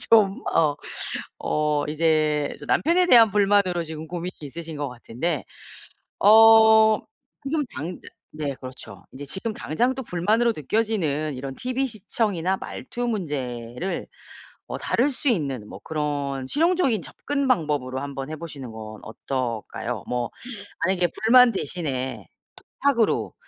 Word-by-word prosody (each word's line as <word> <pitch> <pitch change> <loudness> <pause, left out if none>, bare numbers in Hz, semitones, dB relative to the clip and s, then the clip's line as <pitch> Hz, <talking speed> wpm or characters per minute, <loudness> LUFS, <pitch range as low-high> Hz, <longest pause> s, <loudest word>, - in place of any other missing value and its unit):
좀 205 -4 +5
어 155 -3 +3 0.6
어 150 -1 0
이제 155 -1 +1
좀 - - -10
남편에 350 +4 +3
대한 230 - +7
불만으로 200 -4 +3
지금 160 0 -7
고민이 175 +2 -5
있으신 160 +2 -7
것 145 -1 -2
같은데 125 +6 -3 0.7
어 220 0 +7 0.4
지금 295 +2 0
당즈 170 +4 -6 0.3
네 145 -3 -3
그렇죠. 130 0 -10
이제 140 +2 -8
지금 190 +10 -3
당장 240 - 0
또 265 - -4
불만으로 220 +6 +1
느껴지는 155 -5 -1
이런 135 +1 -5
티브이 255 +2 -1
시청이나 195 -4 -1
말투 245 +5 -5
문제를 140 - -3 0.6
어 - - -4
다룰 260 +5 +1
수 280 +1 -3
있는 135 - -1
뭐 95 - -9
그런 145 -3 -2
실용적인 320 - +2
접근 275 - -2
방법으로 145 - 0
한번 140 0 -5
해 155 - -4
보시는 145 -7 -8
건 110 -1 -9
어떨까요? 120 -1 -4
뭐 120 -1 -1 0.6
만약에 185 -2 +2 0.2
불만 250 +2 +8
대신에 145 - -3 0.5
부탁으로 255 -6 +2
165 Hz, 275 characters per minute, -24 LUFS, 140-220 Hz, 0.7 s, 불만